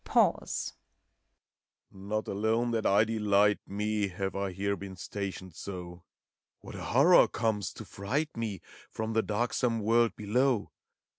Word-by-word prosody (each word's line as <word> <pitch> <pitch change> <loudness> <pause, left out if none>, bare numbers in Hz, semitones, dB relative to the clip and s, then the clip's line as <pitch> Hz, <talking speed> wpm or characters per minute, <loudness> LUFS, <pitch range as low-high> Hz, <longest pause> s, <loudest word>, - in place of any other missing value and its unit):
Pause. - - +1 1.2
Not 100 +2 -4
alone 110 +4 0
that 115 -2 +1
I 100 +2 +5
delight 105 -2 +3
me. 105 +1 -1
Have 95 +1 -4
I 100 -1 -2
here 100 +2 -1
been 95 -1 -8
stationed 95 -1 -6
so: 90 0 -7 0.3
— - - -64
What - - -10
a - - -6
horror 150 +8 +6
comes, 110 -4 -1
to - - -9
fright 140 +11 -2
me. 110 -5 -3 0.3
From 110 0 -3
the 110 - +3
darksome 115 +2 0
world 115 +2 +3
below! 120 +2 +1
105 Hz, 140 wpm, -30 LUFS, 100-115 Hz, 1.2 s, horror